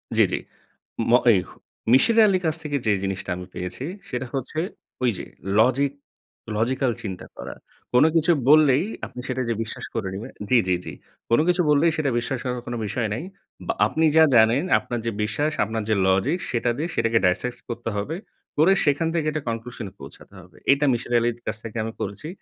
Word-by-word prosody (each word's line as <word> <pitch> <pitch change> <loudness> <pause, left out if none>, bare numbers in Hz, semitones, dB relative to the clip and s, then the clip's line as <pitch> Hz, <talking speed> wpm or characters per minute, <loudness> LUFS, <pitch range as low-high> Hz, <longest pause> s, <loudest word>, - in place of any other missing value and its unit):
জ্বি, - - +6
জ্বি। - - 0 0.7
ম - - +5 0.2
এই, 100 - +4 0.5
মিসির 220 - +5
আলির 190 -3 +2
কাছ 160 -1 +2
থেকে 145 -2 -1
যে, 110 - +3
জিনিসটা 95 0 -3
আমি 90 0 -7
পেয়েছি, 90 +8 -5 0.3
সেটা 125 0 -3
হচ্ছে 135 +4 -3 0.4
ওই 125 - +4
যে, - - -6 0.3
লজিক, 130 +5 +3 0.6
লজিক্যাল 125 +4 +1
চিন্তা 95 -4 -6
করা। - - -7 0.4
কোনো 125 +5 +6
কিছু 165 +1 +4 0.2
বললেই, 150 0 +6 0.2
আপনি - - -10
সেটা 130 0 -2
যে, - - +2
বিশ্বাস 115 - -7
করে 110 -4 -2
নিবেন 110 +7 -6 0.2
জ্বি, 125 - +5
জ্বি, 90 - +3
জ্বি। 80 - -6 0.4
কোনো 115 - +4
কিছু 180 0 +3
বললেই 150 +3 +4
সেটা 150 -3 +1
বিশ্বাস 130 +2 -3
করার 125 -1 -2
কোনো 120 - -3
বিষয় 110 +3 -1
নাই। 115 - -4 0.4
বা 230 - +1
আপনি 160 +1 +1
যা 160 - +9
জানেন 115 +5 +5 0.2
আপনার 120 - -4
যে, 115 - 0
বিশ্বাস, 145 +9 0
আপনার 110 +1 -3
যে, - - +4
লজিক, 95 - +2
সেটা 120 0 0
দিয়ে 160 +4 -2
সেটাকে 115 0 +2
ডাইসেক্ট 120 +7 0
করতে 120 0 -4
হবে। 125 +11 -3 0.4
করে 165 +6 +6
সেখান 145 +2 +2
থেকে 160 -3 0
একটা 155 -1 -3
কনক্লুশন 115 0 -5
এ - - -19
পৌঁছাতে - - -12
হবে। 90 0 -19
এটা 140 +1 +3
মিসির 120 +1 -3
আলির 120 0 +1
কাছ 110 - -2
থেকে 115 0 -7
আমি 115 - -4
করেছি। 100 +8 -5
125 Hz, 195 wpm, -24 LUFS, 110-150 Hz, 0.7 s, যা